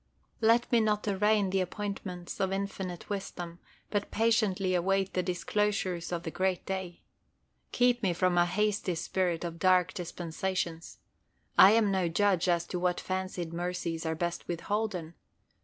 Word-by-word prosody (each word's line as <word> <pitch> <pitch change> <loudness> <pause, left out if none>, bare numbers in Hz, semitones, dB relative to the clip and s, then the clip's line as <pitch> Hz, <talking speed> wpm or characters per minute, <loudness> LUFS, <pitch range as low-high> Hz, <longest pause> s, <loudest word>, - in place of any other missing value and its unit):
Let 230 +2 +4
me 240 - +5
not 210 -1 +1
arraign 205 0 +2
the 190 0 +2
appointments 185 -2 -5
of 190 0 +1
Infinite 195 -2 -4
wisdom, 175 -4 -5 0.3
but 205 -1 -1
patiently 210 -4 +2
await 195 +2 +1
the 185 - +1
disclosures 185 -1 -1
of 170 -1 -2
the 160 - -4
great 185 0 -1
day. 190 -2 -5 0.7
Keep 245 0 +3
me 195 -5 +2
from 180 +1 +1
a 175 0 +4
hasty 205 -1 0
spirit 175 0 -1
under 170 -1 -6
dark 185 0 +4
dispensations. 175 -1 -4 0.6
I 195 +3 +9
am 220 -3 +3
no 190 -2 +1
judge 185 +1 +2
as 170 -1 +2
to 180 - -2
what 180 0 +1
fancied 185 -3 -3
mercies 170 -1 -3
are 160 -1 -1
best 170 +1 -3
withholden. 180 -1 -2
185 Hz, 150 wpm, -30 LUFS, 175-205 Hz, 0.7 s, I